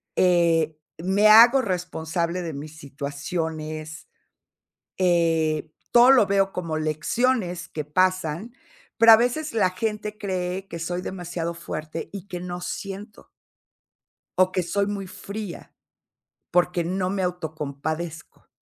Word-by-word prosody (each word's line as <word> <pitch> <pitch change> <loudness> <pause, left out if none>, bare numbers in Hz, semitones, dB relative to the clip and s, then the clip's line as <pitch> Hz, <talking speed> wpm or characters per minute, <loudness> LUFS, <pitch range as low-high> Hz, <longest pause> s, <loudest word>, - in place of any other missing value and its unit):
eh, 165 -3 +3 0.2
me 190 +5 +3
hago 235 +5 +8
responsable 170 -3 -2
de 165 -2 -4
mis 150 +2 -8
situaciones, 155 +2 -5 0.9
eh, 165 -3 +1 0.2
todo 240 +2 +7
lo 240 -6 +5
veo 195 -1 +2
como 165 -3 -3
lecciones 175 - 0
que 155 -2 -5
pasan, 185 +5 0 0.4
pero 230 0 +8
a - - +11
veces 250 +7 -1
la 205 -5 +2
gente 210 +2 -3
cree 190 -2 -3
que 170 - -6
soy 175 +2 -3
demasiado 175 -2 -4
fuerte 160 -1 -6
y 200 -1 -8
que 180 - -5
no 175 0 -5
siento 200 +4 -7 1.1
o 185 0 +4
que 185 -1 0
soy 200 +4 0
muy 200 -2 -4
fría 200 0 -8 0.8
porque 180 0 +2
no 185 +2 -1
me 195 -1 -1
autocompadezco. 160 -1 -5
180 Hz, 125 wpm, -24 LUFS, 160-195 Hz, 1.1 s, a